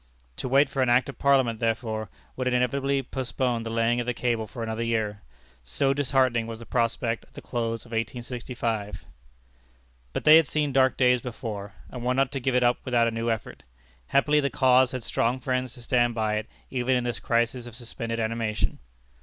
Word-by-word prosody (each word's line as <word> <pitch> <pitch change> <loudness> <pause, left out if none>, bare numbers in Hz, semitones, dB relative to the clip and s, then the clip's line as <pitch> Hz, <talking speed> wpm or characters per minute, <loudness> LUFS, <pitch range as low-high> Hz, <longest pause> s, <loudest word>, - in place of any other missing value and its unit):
To 130 - -4
wait 135 +2 +5
for 135 -1 -2
an 130 - +2
act 120 +2 +3
of 140 - -9
Parliament, 130 -5 +3
therefore, 110 -2 -1 0.3
would 130 0 -2
inevitably 135 +2 +1
postpone 125 -1 -2
the 115 - -5
laying 115 +1 +1
of 120 - -3
the 125 - -1
cable 115 -3 -1
for 115 +3 -6
another 110 0 -3
year. 110 -3 -1 0.4
So 65 - +1
disheartening 130 -4 +1
was 115 -1 -6
the 115 - -11
prospect 115 -1 0
at - - -29
the - - -8
close 115 -1 -3
of 120 - -16
1865. 115 -2 -3 1.1
But - - -3
they 155 +1 +9
had 165 -3 +4
seen 150 -2 0
dark 130 -1 +3
days 125 -1 +4
before, 110 -5 -6 0.2
and 125 -2 -6
were 125 +1 +1
not 135 0 +2
to 135 - -3
give 130 0 0
it 125 - +4
up 120 0 +3
without 120 -3 +2
a - - 0
new 115 +1 -2
effort. 115 -1 -3 0.5
Happily, 150 +2 +3
the 140 -1 +1
cause 130 -1 +4
had 130 -2 -4
strong 120 +3 0
friends 130 -1 -2
to 120 - -10
stand 120 -1 +2
by 110 -1 0
it 105 - -4 0.2
even 130 0 +1
in 125 - +1
this 120 -1 -3
crisis 120 +1 0
of 120 - -10
suspended 115 -1 -5
animation. 110 -1 -1
120 Hz, 200 wpm, -26 LUFS, 115-130 Hz, 1.1 s, they